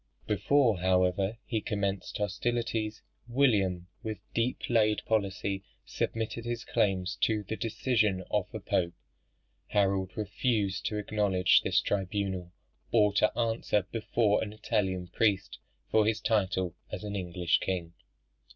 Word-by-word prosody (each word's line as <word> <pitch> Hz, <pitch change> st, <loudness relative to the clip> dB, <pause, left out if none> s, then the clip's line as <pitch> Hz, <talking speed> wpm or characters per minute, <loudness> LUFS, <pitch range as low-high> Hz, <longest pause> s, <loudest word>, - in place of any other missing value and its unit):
Before, 110 Hz, +1 st, +3 dB
however, 95 Hz, +3 st, +2 dB
he 110 Hz, -3 st, -1 dB
commenced 100 Hz, -2 st, -2 dB
hostilities, 110 Hz, +1 st, -1 dB, 0.2 s
William, 100 Hz, -9 st, +2 dB
with 110 Hz, -3 st, -4 dB, 0.2 s
deep 120 Hz, +2 st, -1 dB
laid 110 Hz, -3 st, +2 dB
policy 100 Hz, -2 st, -1 dB, 0.2 s
submitted 115 Hz, +1 st, -2 dB
his 120 Hz, 0 st, -4 dB
claims 95 Hz, -5 st, 0 dB
to 110 Hz, -2 st, +1 dB
the 105 Hz, +3 st, -4 dB
decision 110 Hz, -4 st, +1 dB
of 105 Hz, -3 st, 0 dB
the -, -, -5 dB
Pope. 85 Hz, -1 st, 0 dB, 0.7 s
Harold 95 Hz, -2 st, +1 dB
refused 105 Hz, -1 st, 0 dB
to 105 Hz, -, -2 dB
acknowledge 100 Hz, -3 st, +3 dB
this -, -, +2 dB
tribunal, 95 Hz, -2 st, -2 dB, 0.4 s
or 105 Hz, -3 st, +4 dB
to 105 Hz, +1 st, +3 dB
answer 115 Hz, -3 st, +1 dB
before 110 Hz, -1 st, +1 dB
an 105 Hz, -1 st, -4 dB
Italian 95 Hz, -4 st, -1 dB
priest 100 Hz, +1 st, 0 dB, 0.3 s
for 110 Hz, -1 st, +4 dB
his 110 Hz, 0 st, +1 dB
title 95 Hz, -5 st, +1 dB, 0.2 s
as -, -, -5 dB
an 105 Hz, -1 st, -4 dB
English 90 Hz, -2 st, +1 dB
king. 85 Hz, -3 st, -3 dB
105 Hz, 125 wpm, -30 LUFS, 95-110 Hz, 0.7 s, or